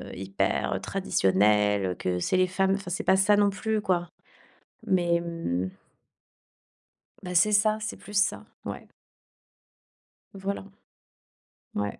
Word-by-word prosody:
hyper, 95 +1 -1
heu, - - -6
traditionnel, 100 0 +2
que 90 -1 -1
c'est 135 - 0
les 185 0 +3
femmes 190 +1 +1
enfin 195 -2 -4
c'est 180 - -2
pas 190 - +4
ça 205 +2 +4
non 205 -1 +4
plus 215 +2 -1
quoi. 175 -4 0 0.8
Mais, 175 -5 +2
hem 165 - -2 1.5
Bah 180 -1 -5
c'est 190 +5 +5
ça, 215 +1 +3
c'est 215 +1 -4
plus 205 - -12
ça. 200 - +1 0.2
Ouais. - - -7 1.4
Voilà. 195 0 -4 1.1
Ouais. 105 0 -2
180 Hz, 125 wpm, -27 LUFS, -, 1.5 s, c'est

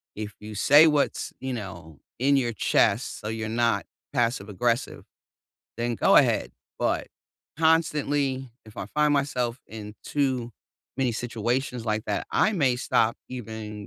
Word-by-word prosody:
if 105 -1 -5
you 105 0 -8
say 145 +9 +7
what's, 150 -2 0
you 130 -1 -3
know, 85 - -8 0.2
in 140 +2 +4
your 120 -3 0
chest - - +1
so 105 - -5
you're 110 -1 -3
not 115 0 +1 0.3
passive 115 -5 0
aggressive, 120 +5 -1 0.7
then 120 +1 -1
go - - +4
ahead, - - +4 0.3
but - - 0 0.5
constantly, 145 -5 +1 0.2
if 110 - -15
I 95 - -4
find 150 +4 +2
myself 130 -4 0
in 105 -1 -8
too 130 -5 -1 0.5
many 130 -3 +1
situations 120 +1 -2
like 110 0 -1
that, - - -2
I 215 - +4
may 135 -9 +2
stop 115 -2 +1
even, 110 -4 -7
120 Hz, 145 wpm, -26 LUFS, 110-135 Hz, 0.7 s, say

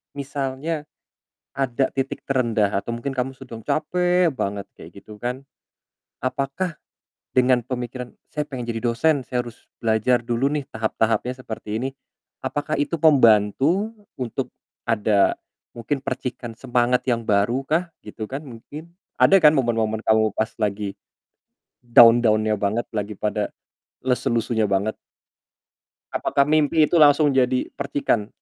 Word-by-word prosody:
misalnya 140 +2 -3 0.7
ada 135 -1 0
titik 135 0 -3
terendah 115 -6 +1
atau 115 +3 -5
mungkin 125 +4 -4
kamu 130 0 -3
sedang 115 -3 -10
capek 180 +1 +1
banget 100 -6 -3
kayak 100 - -13
gitu 105 0 -12
kan 125 +2 -4 0.8
apakah 140 +6 -2 0.6
dengan 125 -1 +4
pemikiran, 125 0 -6 0.2
"Saya 150 -1 -3
pengen 130 -3 -5
jadi 115 -1 -3
dosen, 135 +5 +2
saya 125 -1 -2
harus 120 -1 -13
belajar 115 +2 +1
dulu 120 +3 +1
nih 145 -1 -2
tahap-tahapnya 110 +2 0
seperti 110 -1 -5
ini," 130 - -1 0.5
apakah 145 +1 -2
itu 145 +3 0
pembantu 145 - +4 0.2
untuk 125 -3 -3 0.4
ada, 105 -1 +3 0.4
mungkin 135 +4 -2
percikan 125 -3 -5
semangat 125 0 +1
yang 120 -3 +1
baru 105 +5 +2
kah 170 +2 0
gitu 110 +1 -7
kan 135 +6 -5
mungkin? 145 +7 -10 0.3
Ada 195 - +7
kan 150 -1 +8
momen-momen 115 -5 0
kamu 110 -1 +2
pas 110 +1 -1
lagi 105 -2 -2 0.9
down-down-nya 115 -2 +6
banget, 105 +4 -1
lagi 105 0 -3
pada 105 -1 -1 0.5
lesu-lesunya 115 -3 0
banget. 100 +2 0 1.2
Apakah 140 - +2
mimpi 155 0 +3
itu - - +1
langsung 150 -1 +6
jadi 125 0 +2
percikan, 140 -6 -1
125 Hz, 125 wpm, -23 LUFS, 110-140 Hz, 1.2 s, kan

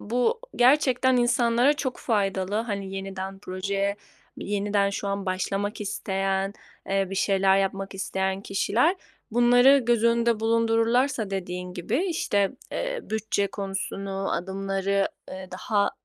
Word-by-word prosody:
bu, 250 - 0 0.2
gerçekten 260 0 +4
insanlara 240 +2 +3
çok 260 -4 -3
faydalı. 195 -3 0
Hani, 200 -3 -3
yeniden 195 0 -5
projeye 195 +1 -2 0.4
yeniden 200 0 0
şu 200 0 -3
an 200 0 -3
başlamak 195 +3 -2
isteyen, 195 -1 -1 0.4
eee, 195 0 +1
bir - - -3
şeyler 195 0 +3
yapmak 195 0 -2
isteyen 190 0 -2
kişiler, 225 - +1 0.3
bunları 245 +4 +6
göz 240 -3 +1
önünde 235 -1 +3
bulundururlarsa 230 +1 +2
dediğin 180 -1 -4
gibi 210 - -1
işte, 205 - +1 0.2
eee, - - -2
bütçe 215 -2 -1
konusunu, 195 0 -4
adımları, 195 +1 -1 0.2
eee, 185 0 -8
daha, 200 +1 0
200 Hz, 120 wpm, -26 LUFS, 195-235 Hz, 0.4 s, bunları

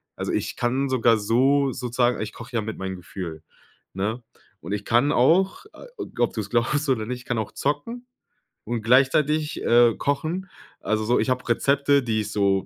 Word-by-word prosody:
also - - -3
ich - - -2
kann 130 +3 0
sogar 115 -3 +3
so 135 +6 +2
sozusagen 125 -1 0
ich 110 0 -5
koche 120 +1 -10
ja - - +1
mit 110 +1 -6
meinen 95 0 -4
Gefühl, 85 -3 -8 0.5
ne? 110 +6 -3 0.4
Und 85 +6 -8
ich 105 -1 -3
kann 120 +5 +3
auch, 185 - +2
äh, - - -13 0.3
ob 120 - +2
du's 105 -2 -4
glaubst 135 +5 0
oder 110 -5 +1
nicht, 125 +1 -4
ich - - -18
kann 120 - -2
auch 110 - -4
zocken 230 - -3 0.6
und 115 0 -3
gleichzeitig, 140 +5 +2
äh, 120 -1 +5
kochen. 160 +6 -2 0.3
Also 110 0 -1
so, 120 +2 +2
ich - - 0
habe 125 0 -1
Rezepte, 140 +3 +2
die 110 -3 0
ich 105 0 -5
so 100 -2 +1
120 Hz, 185 wpm, -24 LUFS, 110-140 Hz, 0.6 s, äh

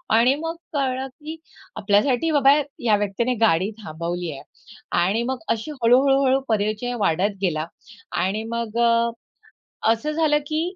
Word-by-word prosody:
आणि 245 +4 +5
मग 330 +1 -3 0.2
कळलं, 265 -1 -1
की 305 +5 -9 0.4
आपल्यासाठी 230 +9 +2
बाबा 280 -1 +5 0.3
या 225 -3 +3
व्यक्तीने 210 +5 -1
गाडी 190 0 +3
थांबवली 170 +1 -4
आहे. 135 - -8 0.6
आणि 200 +7 +1
मग 260 +1 -3
अशी 230 +7 -2
हळू-हळू-हळू 270 +2 +4
परिचय 215 +3 -1
वाढत 195 +2 +1
गेला 160 -4 0 0.6
आणि 205 +4 -1
मग 235 -1 -3
अ, 235 0 +3 0.8
असं 300 +7 -3
झालं 305 -2 +2
की 310 +1 -1
235 Hz, 135 wpm, -23 LUFS, 205-270 Hz, 0.8 s, आणि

